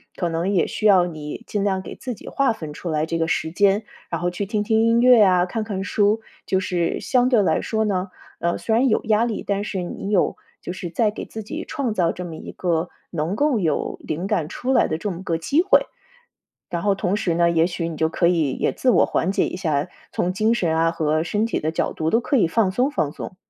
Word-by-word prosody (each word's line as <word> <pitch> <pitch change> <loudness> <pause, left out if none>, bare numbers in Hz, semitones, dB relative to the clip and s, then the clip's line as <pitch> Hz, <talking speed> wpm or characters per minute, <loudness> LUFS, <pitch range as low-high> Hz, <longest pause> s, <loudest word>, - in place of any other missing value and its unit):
可 175 - -1
能 170 +3 -1
也 190 -4 +2
需 215 - 0
要 185 -3 +6
你 155 +4 -7
尽 205 -2 -2
量 190 -2 0
给 - - -8
自 250 -3 -6
己 - - -14
划 275 -3 +1
分 155 -9 -6
出 170 - -6
来 155 -1 0
这 165 0 -2
个 165 - +1
时 160 -1 -1
间， 200 +4 +3 0.3
然 170 - -2
后 175 0 -1
去 195 +2 -4
听 210 0 -1
听 220 +1 +2
音 230 +1 +4
乐 250 -2 +7
呀， 180 -3 +5
看 220 +4 -3
看 195 -3 -4
书。 210 +2 +2 0.3
就 190 - +2
是 175 -2 -1
相 250 0 +2
对 230 -6 +4
来 - - +1
说 220 -1 -1
呢， 190 -2 -1 0.3
嗯， 170 0 0
虽 220 - -2
然 255 +4 +3
有 220 - +1
压 220 +1 +3
力， 230 -3 -2
但 200 0 -1
是 190 -3 -3
你 195 +3 -5
有 200 -4 +2 0.3
就 175 - -4
是 180 -2 -6
在 210 +4 +1
给 - - -7
自 220 -1 -7
己 310 +10 -5
创 275 -8 -2
造 170 -4 +2
这 180 - -6
么 165 -2 -7
一 - - -8
个 170 -1 -1 0.2
能 170 +3 -2
够 285 -5 +2
有 160 -5 -1
灵 170 +5 -3
感 160 -5 -1
出 255 +6 -2
来 - - +4
的 155 - -2
这 205 +4 -3
么 175 +1 -7
个 165 -3 -1
机 280 - +2
会。 385 - +4 0.8
然 170 -1 -3
后 200 -1 +2
同 190 +1 -1
时 190 -6 0
呢， 170 0 +3
也 165 0 +3
许 170 -2 -3
你 160 - -6
就 160 +1 +1
可 170 - +1
以 165 -5 +2
也 - - 0
自 255 - +1
我 - - +4
缓 170 - 0
解 - - +1
一 - - -4
下， 155 -4 -1 0.2
从 180 - 0
精 215 +4 +2
神 170 -8 0
啊， 165 0 +3
和 155 -1 0
身 210 +4 0
体 - - -1
的 155 - -1
角 160 - -1
度 160 0 -1
都 230 - +3
可 275 +3 0
以 200 - +4
放 205 -1 +2
松 255 +7 +1
放 155 - -1
松。 185 - -8
190 Hz, 275 characters per minute, -22 LUFS, 165-220 Hz, 0.8 s, 乐